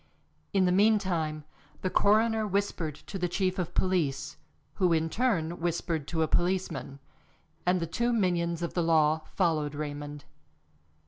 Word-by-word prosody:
In 190 -1 +3
the 180 - +3
meantime 185 -7 +2 0.4
the 185 - 0
coroner 220 +1 +3
whispered 195 -6 -1
to 195 - -8
the 180 - +1
chief 185 +1 -1
of 175 -1 -3
police, 150 -8 0 0.4
who 180 -3 +3
in 160 0 0
turn 175 -9 0
whispered 165 -3 -2
to 160 -2 0
a - - +1
policeman, 175 -7 -1 0.7
and 180 0 +3
the 165 - -1
two 235 +9 0
minions 175 -6 0
of 170 - -3
the 175 - +1
law 160 -1 +3
followed 155 -5 +1
Raymond. 145 -1 -6
175 Hz, 145 wpm, -29 LUFS, 155-190 Hz, 0.7 s, In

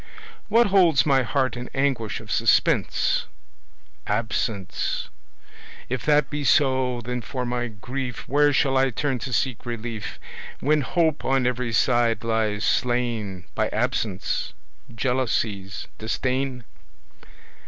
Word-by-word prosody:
What 230 +3 +5
holds 180 -7 +4
my 135 -3 +4
heart 130 -1 0
in 125 0 -6
anguish 135 -5 0
of - - -10
suspense? - - +2 0.8
Absence. 105 -2 -2 0.8
If 130 0 -2
that 150 -1 +3
be 145 0 -2
so, 130 -3 +2
then 125 +1 -3
for 130 0 -4
my 120 0 -1
grief 125 +3 -6
Where 145 +1 +4
shall 135 -1 +2
I 135 0 +3
turn 130 +1 -1
to 130 +2 -5
seek 125 0 0
relief, 115 -3 -5 0.4
When 150 +2 +2
hope 160 +1 +1
on 135 -1 +2
every 125 -1 -1
side 120 0 +2
lies 110 -2 0
slain 115 -7 0
By - - 0
Absence, 95 -4 -1 0.4
Jealousies, 110 -5 -1
Disdain? 125 +3 -2
125 Hz, 120 wpm, -24 LUFS, 115-135 Hz, 0.8 s, What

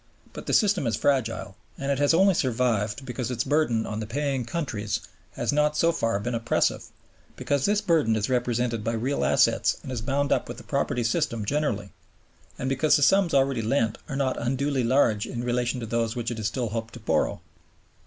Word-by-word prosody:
But - - -9
the - - -1
system 200 - +3
is 110 - +1
fragile; 115 -7 0 0.2
and 140 +1 -2
it 140 - 0
has 145 0 +4
only 190 +4 +5
survived 120 - 0
because 125 -1 -4
its 125 -1 -1
burden 135 -6 +1
on 105 0 -4
the 110 - -5
paying 135 0 -1
countries 110 - -3 0.3
has - - -1
not 150 +1 +2
so 170 - +4
far 115 -9 0
been 120 +4 -3
oppressive, 115 0 0 0.5
because 140 -1 0
this 205 0 +2
burden 160 - +2
is 105 -1 0
represented 120 -3 0
by 115 - -1
real 125 +5 -1
assets - - +3
and - - -7
is 120 -3 -3
bound 140 +3 -1
up - - +1
with - - -7
the - - -10
property 120 - -1
system 115 -3 0
generally, 105 -7 -1 0.7
and 130 - -3
because 135 +3 +3
the 145 - +2
sums 185 +1 +4
already 135 -3 +2
lent 115 -1 0
are 135 - -3
not 135 -2 -1
unduly 135 +2 0
large 115 -4 +2
in 120 -1 -4
relation 125 +1 -1
to - - -3
those 115 +1 -1
which 120 -1 -2
it 115 - -5
is 105 - -1
still 120 +1 -2
hoped 115 +2 -5
to - - -9
borrow. 110 - 0
125 Hz, 205 wpm, -26 LUFS, 115-140 Hz, 0.7 s, only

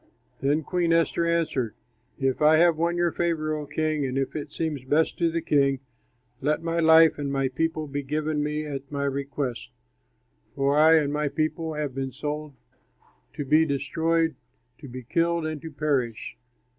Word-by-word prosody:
Then 145 +3 +1
Queen 175 +1 0
Esther 165 0 +2
answered, 155 -9 0 0.4
"If 135 0 -1
I 155 +1 +6
have 170 0 +5
won 170 +2 0
your 175 -1 +2
favor, 155 -3 -1
O 150 -1 -5
king, 155 0 -1
and 130 0 -2
if 135 -1 -2
it 150 -1 -5
seems 155 -4 -3
best 150 +5 +1
to 170 -1 +3
the 165 0 -2
king, 140 -2 +2 0.6
let 150 +4 0
my 165 0 -1
life 160 -1 +6
and 140 -1 -2
my 135 -1 0
people 160 +3 -1
be 145 0 -4
given 150 +2 -2
me 150 +1 -2
at 140 -1 -6
my 140 -1 -2
request, 140 -3 -3 0.9
for 140 0 +1
I 160 +2 +6
and 145 -2 +2
my 150 0 0
people 155 +2 -2
have 150 -3 -3
been 135 0 -3
sold 150 +1 -5 0.8
to 145 - -5
be 155 +4 +4
destroyed, 160 +2 0 0.5
to 140 - -10
be 130 0 -8
killed, 170 +5 0
and 155 -2 -4
to 160 - -7
perish!" 140 -7 -2
150 Hz, 175 wpm, -26 LUFS, 140-160 Hz, 0.9 s, I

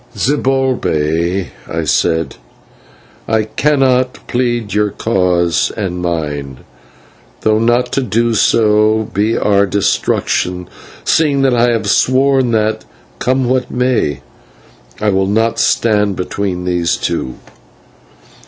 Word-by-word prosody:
"Zibalbay," 95 - 0 0.2
I 80 0 -2
said, 80 +3 0 0.9
"I 110 -1 +1
cannot 130 0 +1
plead 120 -4 -1
your 105 0 +1
cause 90 -6 0
and 90 -4 -3
mine, 75 -6 -4 0.8
though 110 0 +2
not 120 +2 +1
to 135 - 0
do 115 0 0
so 110 0 +2
be 105 +4 +1
our 100 -1 +2
destruction, 90 -2 -1 0.4
seeing 145 -4 +2
that 135 -2 +3
I 120 0 +3
have 110 -3 -1
sworn 130 +3 +2
that, 110 -1 0 0.4
come 130 0 0
what 130 0 0
may, 125 - 0 0.8
I 105 - +1
will 95 -1 +1
not 110 +3 0
stand 105 -3 +1
between 90 0 -3
these 90 -2 0
two. 65 - -3
110 Hz, 110 wpm, -15 LUFS, 90-125 Hz, 0.9 s, that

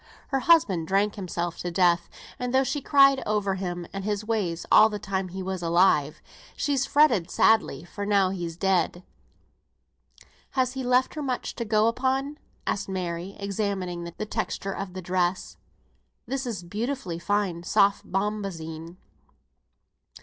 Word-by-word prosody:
Her 270 - +1
husband 215 - +3
drank 200 +3 +2
himself 175 -3 -4
to 175 - -3
death, 175 0 +2 0.3
and 250 0 -2
though 265 - +5
she 285 +2 -2
cried 275 -1 +5
over 205 -2 +1
him 175 -2 -4
and 195 0 -4
his 210 +1 -2
ways 200 -7 -1
all 215 - +8
the 210 - -4
time 190 -2 -3
he 190 +1 -6
was 190 -1 -4
alive, 165 -3 +2 0.3
she's 275 -2 0
fretted 270 - +3
sadly 215 -10 +3
for 175 +4 -9
him 200 - -2
now 200 -2 +4
he's 170 -3 -5
dead." 185 -1 +1 1.5
"Has 255 -1 +2
he 265 -1 -4
left 250 +1 +2
her 305 - -5
much 260 -3 -3
to 235 - -4
go 215 0 +3
upon?" 265 +4 -1 0.3
asked 200 0 -2
Mary, 180 0 -4
examining 195 -4 -3
the 170 +5 -6
texture 195 -1 -3
of 195 -2 -6
the 185 -1 -7
dress. 180 +1 -1 0.7
"This 270 -1 -3
is 205 -7 -4
beautifully 210 -1 -4
fine 195 -2 -1
soft 200 +2 +2
bombazine." 180 -5 -3
195 Hz, 150 wpm, -26 LUFS, 175-225 Hz, 1.5 s, all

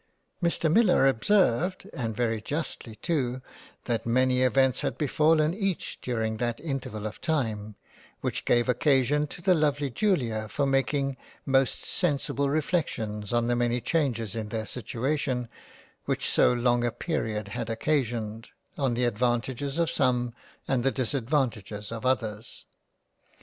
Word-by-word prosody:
Mr 170 -2 +1
Millar 205 -10 +5
observed 180 - +2
(and 115 -4 -3
very 115 -2 0
justly 135 -4 -4
too) 130 -1 -1 0.5
that 115 -3 -1
many 125 +2 +2
events 130 0 +3
had 135 -4 -2
befallen 155 +2 +3
each 195 -2 -3
during 110 -3 -1
that 120 0 -1
interval 135 -8 -4
of 110 - -6
time, 110 -10 -1 0.5
which - - -2
gave 120 0 +3
occasion 140 +3 +2
to 175 - -9
the 185 - +5
lovely 145 -4 +1
Julia 120 - 0
for 140 +7 -1
making 135 0 +1 0.3
most 135 -1 +1
sensible 140 -4 0
reflections 125 - -1
on 120 -1 +2
the 120 0 +1
many 120 0 +1
changes 120 - -1
in 110 -2 -4
their 110 0 -3
situation 125 +2 -2 0.6
which - - -1
so - - +4
long 120 0 +2
a 120 - +2
period 110 - -3
had 115 +1 -4
occasioned, 115 -3 -1 0.3
on 130 -4 +1
the 125 +1 +1
advantages 120 +4 -1
of 170 -1 +1
some, 125 -2 +1 0.3
and 130 -3 +1
the 135 - +4
disadvantages 120 -6 -1
of 115 +2 -3
others. 115 -3 -2
125 Hz, 140 wpm, -27 LUFS, 115-145 Hz, 0.6 s, Millar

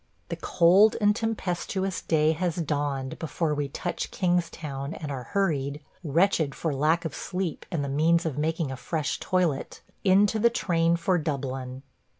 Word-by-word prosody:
The - - -2
cold 185 +5 +4
and 205 -1 +3
tempestuous 195 -4 -2
day 155 -1 +2
has 170 +1 -1
dawned 145 -5 -2
before 160 -1 -1
we 145 -1 -2
touch 175 +5 -4
Kingstown 165 -6 -2
and 150 -3 -6
are 130 -3 -5
hurried 145 -6 -1 0.2
– - - -35
wretched 160 -2 +2
for 160 -3 -2
lack 155 +5 +1
of 160 - -3
sleep 180 -3 -4
and 160 -4 -2
the - - -3
means 165 +5 +2
of 155 -5 -2
making 155 0 -1
a 130 - -5
fresh 155 +1 -2
toilet 180 -6 -1
– - - -41
into 200 +3 +4
the 235 +2 +5
train 170 -6 +1
for 175 +1 +1
Dublin. 135 -3 -4
165 Hz, 165 wpm, -27 LUFS, 145-180 Hz, 0.2 s, the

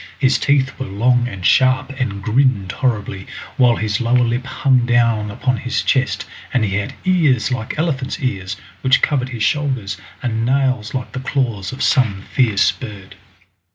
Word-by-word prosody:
His 130 -2 +2
teeth 135 -1 +1
were 130 - -4
long 120 +5 +2
and 100 -6 -7
sharp 130 0 +3
and 100 -6 -2
grinned 115 -4 +2
horribly, 105 -7 -2 0.3
while 125 -3 +4
his 105 -1 -1
lower 120 +1 +3
lip 120 +2 -1
hung 130 -1 +2
down 115 -3 +2
upon 125 +4 -1
his 125 0 -2
chest, 130 -1 0 0.3
and 125 -4 +1
he 100 -1 -1
had 105 - -4
ears 150 - +2
like 120 0 -3
elephant's 145 -5 -1
ears, 100 - -3 0.2
which 130 0 +3
covered 130 -4 +1
his 120 -4 -3
shoulders, 125 -8 -1 0.3
and 115 -2 -1
nails 130 -3 0
like 125 -2 -4
the - - -5
claws 125 -7 -2
of 130 - -4
some 110 -9 +2
fierce 105 -8 +3
bird. 100 -1 -10
125 Hz, 165 wpm, -19 LUFS, 105-130 Hz, 0.3 s, while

